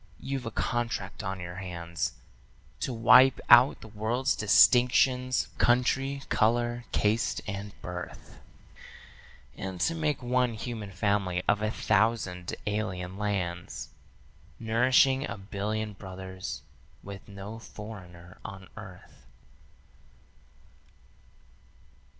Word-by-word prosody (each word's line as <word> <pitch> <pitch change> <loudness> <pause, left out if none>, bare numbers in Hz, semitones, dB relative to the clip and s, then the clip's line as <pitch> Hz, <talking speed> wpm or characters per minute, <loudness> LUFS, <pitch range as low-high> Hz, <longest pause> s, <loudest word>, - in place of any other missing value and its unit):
You've 135 -3 -4
a - - -1
contract 120 +1 -2
on 95 -2 -4
your 90 0 -7
hands 85 -2 -4 0.7
To 130 - -2
wipe 125 +3 +6
out 120 +3 +7
the - - -10
world's 110 +5 0
distinctions, 125 +4 +4
country, 135 +3 +2
color, 120 +1 +1
caste, 110 +4 +1
and 100 0 -6
birth, 90 0 -8 1.2
And 95 -2 -6
to 165 - +2
make 150 -5 -1
one 125 -1 +1
human 110 -2 -5
family 95 -2 0
of 105 - +3
a 110 - +1
thousand 105 -5 0
alien 95 -3 -3
lands, 90 -5 -3 0.7
Nourishing 130 +4 +3
a - - -5
billion 105 +2 -3
brothers 95 -1 -7 0.4
with 100 0 -9
no 100 +2 -8
foreigner 90 -6 -11
on 95 -3 -9
earth. - - -13
110 Hz, 100 wpm, -29 LUFS, 95-120 Hz, 1.2 s, out